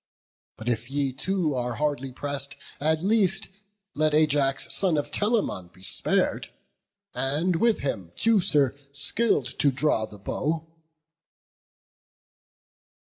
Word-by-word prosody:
But 110 Hz, -, -9 dB
if 120 Hz, 0 st, -1 dB
ye 140 Hz, -1 st, -1 dB
too 170 Hz, +2 st, -1 dB
are 125 Hz, -2 st, -2 dB
hardly 145 Hz, -2 st, -1 dB
press'd, 140 Hz, +1 st, -3 dB, 0.2 s
at 160 Hz, +2 st, +1 dB
least 195 Hz, -2 st, +3 dB, 0.4 s
Let 155 Hz, 0 st, +2 dB
Ajax, 145 Hz, -3 st, +2 dB
son 180 Hz, -5 st, +1 dB
of 145 Hz, -, -2 dB
Telamon, 205 Hz, -, 0 dB
be 95 Hz, -, -19 dB
spar'd, -, -, 0 dB, 0.6 s
And 155 Hz, +6 st, 0 dB
with 230 Hz, +4 st, +2 dB
him 95 Hz, -11 st, -3 dB
Teucer, 160 Hz, -, +3 dB, 0.2 s
skill'd 140 Hz, -, +1 dB
to 145 Hz, -, +4 dB
draw 135 Hz, -5 st, +1 dB
the 105 Hz, -, -12 dB
bow." 155 Hz, +10 st, -2 dB
145 Hz, 115 wpm, -26 LUFS, 130-165 Hz, 0.6 s, to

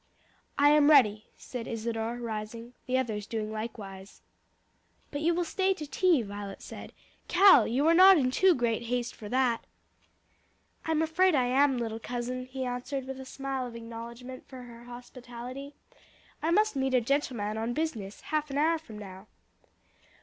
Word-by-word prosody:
"I 285 Hz, +1 st, +6 dB
am 300 Hz, 0 st, +5 dB
ready," 215 Hz, -8 st, +5 dB
said 245 Hz, -2 st, -7 dB
Isadore, 230 Hz, +1 st, -3 dB
rising, 230 Hz, +1 st, -6 dB
the 255 Hz, 0 st, +1 dB
others 215 Hz, -5 st, -2 dB
doing 215 Hz, -2 st, -3 dB
likewise. 205 Hz, -3 st, -8 dB, 0.9 s
"But 285 Hz, -, -4 dB
you 335 Hz, +2 st, +2 dB
will 350 Hz, -, +1 dB
stay 380 Hz, +3 st, +1 dB
to 310 Hz, -, -6 dB
tea?" 305 Hz, -1 st, +2 dB
Violet 200 Hz, -1 st, -7 dB
said. -, -, -9 dB, 0.4 s
"Cal, 380 Hz, +2 st, +7 dB
you 265 Hz, +6 st, +1 dB
are 330 Hz, -, +5 dB
not 375 Hz, +2 st, +8 dB
in 255 Hz, -4 st, +1 dB
too 370 Hz, +6 st, +4 dB
great 235 Hz, -2 st, 0 dB
haste 245 Hz, +1 st, -2 dB
for 210 Hz, -, -10 dB
that?" 250 Hz, -2 st, +1 dB, 1.2 s
"I'm 320 Hz, 0 st, +1 dB
afraid 325 Hz, +2 st, +3 dB
I 255 Hz, -3 st, +3 dB
am, 265 Hz, +1 st, +3 dB
little 225 Hz, -2 st, -3 dB
cousin," 250 Hz, +2 st, -4 dB
he 260 Hz, 0 st, -4 dB
answered 250 Hz, +2 st, -4 dB
with 265 Hz, 0 st, -7 dB
a 265 Hz, -, -8 dB
smile 270 Hz, -1 st, -4 dB
of 235 Hz, -, -10 dB
acknowledgment 235 Hz, +2 st, -9 dB
of -, -, -35 dB
her 245 Hz, -2 st, -11 dB
hospitality. 245 Hz, +3 st, -9 dB, 0.7 s
"I 315 Hz, -, 0 dB
must 425 Hz, +3 st, +3 dB
meet 265 Hz, -1 st, 0 dB
a 250 Hz, -, +4 dB
gentleman 230 Hz, -5 st, -1 dB
on 230 Hz, +2 st, -2 dB
business, 230 Hz, -11 st, -3 dB
half 305 Hz, -1 st, -2 dB
an 275 Hz, -, -3 dB
hour 320 Hz, +2 st, +2 dB
from 225 Hz, -9 st, -12 dB
now." 195 Hz, -1 st, -10 dB
250 Hz, 165 wpm, -29 LUFS, 230-285 Hz, 1.2 s, not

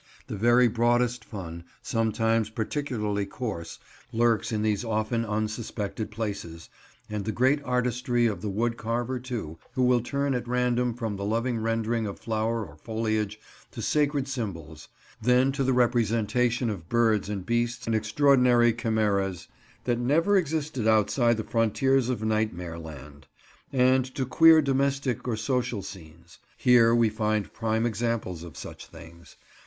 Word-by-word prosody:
The 120 Hz, -, -6 dB
very 120 Hz, +4 st, +4 dB
broadest 120 Hz, +1 st, +1 dB
fun, 85 Hz, -6 st, -8 dB, 0.2 s
sometimes 115 Hz, -1 st, +1 dB
particularly 110 Hz, -3 st, -2 dB
coarse, 100 Hz, -7 st, -5 dB, 0.3 s
lurks 115 Hz, -2 st, +1 dB
in 110 Hz, -1 st, -1 dB
these 105 Hz, 0 st, 0 dB
often 110 Hz, +1 st, -1 dB
unsuspected 110 Hz, 0 st, -3 dB
places; 100 Hz, -7 st, -5 dB, 0.4 s
and 105 Hz, -1 st, -4 dB
the 110 Hz, -, -2 dB
greatest 135 Hz, +5 st, +1 dB
artistry 125 Hz, -1 st, +1 dB
of 105 Hz, -6 st, -1 dB
the 105 Hz, -, -3 dB
wood 115 Hz, +4 st, -1 dB
carver 120 Hz, +3 st, -2 dB
too, 115 Hz, -11 st, -6 dB, 0.2 s
who 130 Hz, -, +2 dB
will 125 Hz, -1 st, +4 dB
turn 140 Hz, +3 st, -1 dB
at 125 Hz, -1 st, -3 dB
random 125 Hz, -1 st, +1 dB
from 110 Hz, -4 st, -3 dB
the 100 Hz, -, -5 dB
loving 115 Hz, +3 st, 0 dB
rendering 115 Hz, 0 st, -1 dB
of 100 Hz, -, -6 dB
flower 110 Hz, 0 st, -1 dB
or 75 Hz, -4 st, -14 dB
foliage, 110 Hz, +1 st, -2 dB, 0.3 s
to 115 Hz, -, -7 dB
sacred 145 Hz, 0 st, +1 dB
symbols; 85 Hz, -, -6 dB, 0.3 s
then 125 Hz, +3 st, +3 dB
to 135 Hz, 0 st, -1 dB
the 130 Hz, -, +2 dB
representation 120 Hz, 0 st, +1 dB
of 85 Hz, -5 st, -8 dB
birds 110 Hz, -4 st, +2 dB
and 100 Hz, -3 st, -4 dB
beasts 120 Hz, +2 st, -1 dB
and 115 Hz, -, 0 dB
extraordinary 120 Hz, +1 st, +4 dB
chimeras 105 Hz, -6 st, -1 dB, 0.3 s
that 120 Hz, -1 st, 0 dB
never 160 Hz, +11 st, +2 dB
existed 155 Hz, -, 0 dB
outside 110 Hz, +2 st, +3 dB
the 110 Hz, -, -2 dB
frontiers 120 Hz, +4 st, +1 dB
of 120 Hz, -4 st, -2 dB
Nightmare 105 Hz, -6 st, -1 dB
Land; 70 Hz, -3 st, -11 dB, 0.4 s
and 130 Hz, 0 st, +4 dB
to 130 Hz, -, -1 dB
queer 160 Hz, +4 st, +6 dB
domestic 135 Hz, -2 st, 0 dB
or 115 Hz, -3 st, -1 dB
social 120 Hz, -2 st, -1 dB
scenes. 85 Hz, -4 st, -12 dB, 0.2 s
Here 120 Hz, -2 st, +5 dB
we 115 Hz, -2 st, +4 dB
find 110 Hz, -1 st, -1 dB
prime 110 Hz, 0 st, 0 dB
examples 115 Hz, -6 st, -2 dB
of 85 Hz, -2 st, -10 dB
such -, -, -9 dB
things. 85 Hz, +1 st, -14 dB
115 Hz, 150 wpm, -27 LUFS, 105-125 Hz, 0.4 s, queer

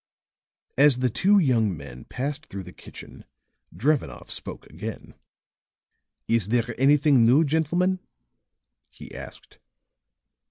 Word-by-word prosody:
As 140 Hz, -3 st, +6 dB
the 125 Hz, -1 st, 0 dB
two 200 Hz, -, +3 dB
young 115 Hz, -, +2 dB
men 65 Hz, -3 st, -11 dB
passed 145 Hz, +4 st, -5 dB
through 95 Hz, 0 st, -7 dB
the 90 Hz, 0 st, -12 dB
kitchen -, -, -13 dB, 0.5 s
Drevenoff 115 Hz, -, -1 dB
spoke -, -, -7 dB
again. 100 Hz, +8 st, -8 dB, 1.1 s
"Is 115 Hz, -4 st, +1 dB
there 120 Hz, +1 st, 0 dB
anything 140 Hz, -2 st, +5 dB
new, 130 Hz, +8 st, +5 dB
gentlemen?" 170 Hz, +5 st, 0 dB, 0.9 s
he -, -, -13 dB
asked. -, -, -11 dB
125 Hz, 110 wpm, -25 LUFS, 105-150 Hz, 1.1 s, As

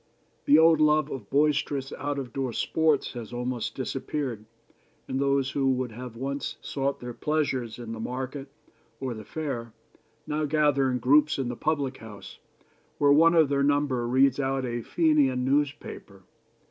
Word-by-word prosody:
The 145 Hz, -, +6 dB
old 160 Hz, -1 st, +5 dB
love 150 Hz, -1 st, +3 dB
of 115 Hz, -7 st, -7 dB
boisterous 145 Hz, -1 st, +1 dB
out 145 Hz, 0 st, -3 dB
of 130 Hz, -3 st, -5 dB
door 130 Hz, -3 st, -2 dB
sports 160 Hz, +1 st, +1 dB
has 120 Hz, -3 st, -7 dB
almost 125 Hz, -1 st, -3 dB
disappeared, 130 Hz, -3 st, -4 dB, 0.6 s
and 130 Hz, -, -2 dB
those 140 Hz, -1 st, +1 dB
who 135 Hz, -2 st, +1 dB
would 125 Hz, -2 st, -3 dB
have 120 Hz, +1 st, -8 dB
once 140 Hz, +3 st, -4 dB
sought 140 Hz, 0 st, -2 dB
their 120 Hz, 0 st, -6 dB
pleasures 130 Hz, -3 st, -1 dB
in 120 Hz, -2 st, -7 dB
the 115 Hz, -, -6 dB
market 130 Hz, +4 st, -5 dB, 0.5 s
or 130 Hz, -2 st, -3 dB
the 110 Hz, -1 st, -8 dB
fair 120 Hz, -4 st, -5 dB, 0.5 s
now 150 Hz, +1 st, -1 dB
gather 145 Hz, -3 st, +2 dB
in 125 Hz, -, 0 dB
groups 145 Hz, +5 st, +3 dB
in 135 Hz, -3 st, -2 dB
the 120 Hz, -, -4 dB
public 140 Hz, -2 st, -1 dB
house, 110 Hz, -2 st, -11 dB, 0.6 s
where 145 Hz, -1 st, +5 dB
one 165 Hz, +3 st, +5 dB
of 160 Hz, -4 st, +5 dB
their 140 Hz, -1 st, +1 dB
number 140 Hz, -4 st, +1 dB
reads 130 Hz, +2 st, +3 dB
out 135 Hz, -1 st, -1 dB
a 120 Hz, -1 st, -3 dB
Fenian 140 Hz, -4 st, +2 dB
newspaper. 135 Hz, -8 st, -2 dB
135 Hz, 160 wpm, -27 LUFS, 125-145 Hz, 0.6 s, The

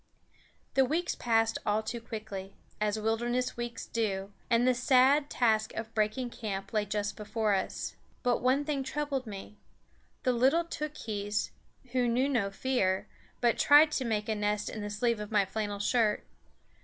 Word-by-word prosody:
The 270 Hz, -, +5 dB
weeks 325 Hz, +7 st, 0 dB
passed 225 Hz, -1 st, +1 dB
all 210 Hz, +1 st, +1 dB
too 230 Hz, +2 st, -4 dB
quickly, 215 Hz, -4 st, -7 dB, 0.2 s
as 210 Hz, 0 st, +1 dB
wilderness 240 Hz, +3 st, 0 dB
weeks 240 Hz, -1 st, -5 dB
do, 200 Hz, -3 st, -2 dB, 0.2 s
and 240 Hz, +1 st, +4 dB
the 255 Hz, -, +5 dB
sad 265 Hz, +4 st, +4 dB
task 220 Hz, -3 st, +1 dB
of 220 Hz, 0 st, -5 dB
breaking 220 Hz, +3 st, 0 dB
camp 200 Hz, -3 st, -5 dB
lay 210 Hz, -1 st, +1 dB
just 205 Hz, 0 st, -2 dB
before 215 Hz, 0 st, 0 dB
us. 195 Hz, -, -2 dB, 0.3 s
But 245 Hz, -2 st, +2 dB
one 265 Hz, +3 st, +2 dB
thing 290 Hz, -2 st, -1 dB
troubled 275 Hz, -1 st, -2 dB
me 205 Hz, 0 st, -8 dB, 0.7 s
the 255 Hz, -, +3 dB
little 265 Hz, +8 st, +3 dB
Tookhees, 220 Hz, -11 st, -3 dB, 0.4 s
who 250 Hz, -1 st, +2 dB
knew 250 Hz, +3 st, +2 dB
no 235 Hz, -8 st, +1 dB
fear, 195 Hz, -3 st, 0 dB, 0.4 s
but 240 Hz, -2 st, +2 dB
tried 300 Hz, +2 st, +7 dB
to 270 Hz, -, 0 dB
make 215 Hz, -3 st, -1 dB
a 220 Hz, -, +1 dB
nest 210 Hz, 0 st, -1 dB
in 215 Hz, -, -5 dB
the 205 Hz, -, -4 dB
sleeve 230 Hz, +2 st, 0 dB
of 210 Hz, 0 st, -6 dB
my 205 Hz, -2 st, +3 dB
flannel 205 Hz, +1 st, -3 dB
shirt. 215 Hz, +1 st, +1 dB
225 Hz, 165 wpm, -30 LUFS, 210-255 Hz, 0.7 s, tried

